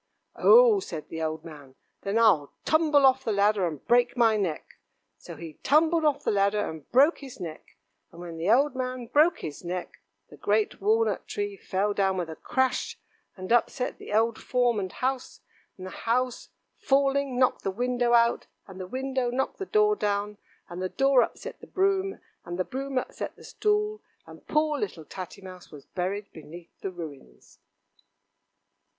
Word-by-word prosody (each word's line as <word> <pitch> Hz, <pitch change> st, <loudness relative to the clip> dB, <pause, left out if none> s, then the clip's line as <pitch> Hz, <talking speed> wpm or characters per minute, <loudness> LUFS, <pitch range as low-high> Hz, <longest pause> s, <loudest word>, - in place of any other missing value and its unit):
"Oh!" 470 Hz, -3 st, +6 dB
said 165 Hz, -, -7 dB
the 160 Hz, -, -5 dB
old 155 Hz, 0 st, -3 dB
man, 145 Hz, -5 st, -12 dB, 0.3 s
"then 200 Hz, +3 st, -1 dB
I'll 195 Hz, -11 st, +4 dB
tumble 310 Hz, -3 st, +4 dB
off 265 Hz, 0 st, +4 dB
the 225 Hz, -, -1 dB
ladder 200 Hz, -2 st, +2 dB
and 155 Hz, -4 st, -7 dB
break 245 Hz, +1 st, +3 dB
my 225 Hz, -2 st, +4 dB
neck." 185 Hz, -7 st, -3 dB, 0.4 s
So -, -, -10 dB
he 160 Hz, -3 st, -10 dB
tumbled 315 Hz, +3 st, +3 dB
off 290 Hz, -1 st, +1 dB
the -, -, +1 dB
ladder 200 Hz, +1 st, +1 dB
and 160 Hz, -2 st, -9 dB
broke 280 Hz, +7 st, +5 dB
his 270 Hz, -5 st, -10 dB
neck; 165 Hz, -4 st, -9 dB, 0.3 s
and 170 Hz, -, -14 dB
when 170 Hz, -2 st, -8 dB
the 165 Hz, +4 st, -1 dB
old 270 Hz, +5 st, +4 dB
man 255 Hz, -1 st, -3 dB
broke 305 Hz, +8 st, +3 dB
his 150 Hz, +1 st, -7 dB
neck, 180 Hz, +1 st, -5 dB, 0.3 s
the -, -, -12 dB
great 435 Hz, -1 st, 0 dB
walnut 445 Hz, +2 st, +1 dB
tree 410 Hz, -1 st, -3 dB
fell 205 Hz, -, -1 dB
down 195 Hz, -2 st, +1 dB
with 170 Hz, -3 st, -3 dB
a -, -, -7 dB
crash, 260 Hz, +7 st, -1 dB, 0.4 s
and 185 Hz, +3 st, -7 dB
upset 250 Hz, +2 st, 0 dB
the -, -, -9 dB
old 225 Hz, +2 st, +2 dB
form 245 Hz, -3 st, +1 dB
and 190 Hz, -2 st, -4 dB
house, 260 Hz, 0 st, -3 dB, 0.4 s
and 185 Hz, -, -8 dB
the 185 Hz, -, -7 dB
house 250 Hz, +2 st, -1 dB, 0.3 s
falling 275 Hz, -1 st, +1 dB
knocked 255 Hz, 0 st, +2 dB
the -, -, 0 dB
window 245 Hz, +3 st, 0 dB
out, 235 Hz, 0 st, +3 dB, 0.2 s
and 190 Hz, -1 st, -11 dB
the 185 Hz, -, -6 dB
window 260 Hz, +2 st, -2 dB
knocked 260 Hz, +2 st, -2 dB
the 390 Hz, -, -4 dB
door 425 Hz, 0 st, +3 dB
down, 205 Hz, -, -2 dB, 0.3 s
and 175 Hz, +1 st, -7 dB
the 185 Hz, -, -2 dB
door 270 Hz, +1 st, +4 dB
upset -, -, -4 dB
the -, -, -11 dB
broom, 390 Hz, 0 st, 0 dB, 0.2 s
and 175 Hz, 0 st, -6 dB
the 185 Hz, -, -1 dB
broom 270 Hz, +1 st, -4 dB
upset 255 Hz, -, -4 dB
the -, -, -16 dB
stool, 425 Hz, 0 st, -1 dB, 0.2 s
and -, -, -15 dB
poor 305 Hz, -1 st, +1 dB
little 175 Hz, -7 st, -4 dB
Tatty 190 Hz, +2 st, -8 dB
Mouse 185 Hz, -1 st, -11 dB
was 145 Hz, -3 st, -13 dB
buried 195 Hz, +3 st, -3 dB
beneath 165 Hz, +2 st, -12 dB
the 195 Hz, -, -3 dB
ruins. 150 Hz, -, -11 dB
230 Hz, 180 wpm, -27 LUFS, 185-275 Hz, 0.4 s, Oh